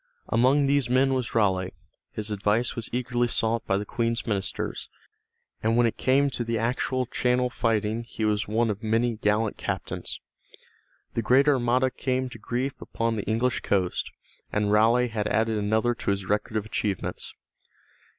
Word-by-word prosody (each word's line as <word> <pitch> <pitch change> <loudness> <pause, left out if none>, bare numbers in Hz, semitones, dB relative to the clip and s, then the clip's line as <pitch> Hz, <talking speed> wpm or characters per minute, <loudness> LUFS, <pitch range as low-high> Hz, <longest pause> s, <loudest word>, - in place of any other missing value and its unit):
Among 135 +4 +4
these 140 -3 +2
men 130 +2 +3
was 125 -3 -2
Raleigh; 95 -4 +2 0.4
his 105 0 -5
advice 105 +4 +1
was 115 - -5
eagerly 120 0 0
sought 115 0 0
by 95 - +2
the 105 - -3
Queen's 115 +1 -1
ministers, 100 -4 -3 0.7
and 115 +1 +2
when 120 - +5
it 115 - 0
came 140 +2 +3
to 120 - -2
the 115 0 -1
actual 125 +3 0
Channel 125 +1 +1
fighting 110 -1 0
he 110 -1 -3
made 105 +1 +1
one 110 +2 +1
of 105 +1 -6
many 115 +1 +1
gallant 105 0 +1
captains. - - -4 0.9
The 115 - 0
great 130 +6 +4
Armada 130 -1 +3
came 130 0 -1
to 115 - -11
grief 125 +5 -2
upon 115 0 -2
the 105 - -3
English 120 +4 +1
coast, 95 -3 0 0.4
and 105 0 +1
Raleigh 115 +3 +4
had 105 -2 -2
added 110 0 +1
another 110 +3 +1
to 115 - -4
his 100 -1 0
record 105 +2 -1
of 105 - -2
achievements. 105 -3 -2
115 Hz, 165 wpm, -26 LUFS, 105-125 Hz, 0.9 s, when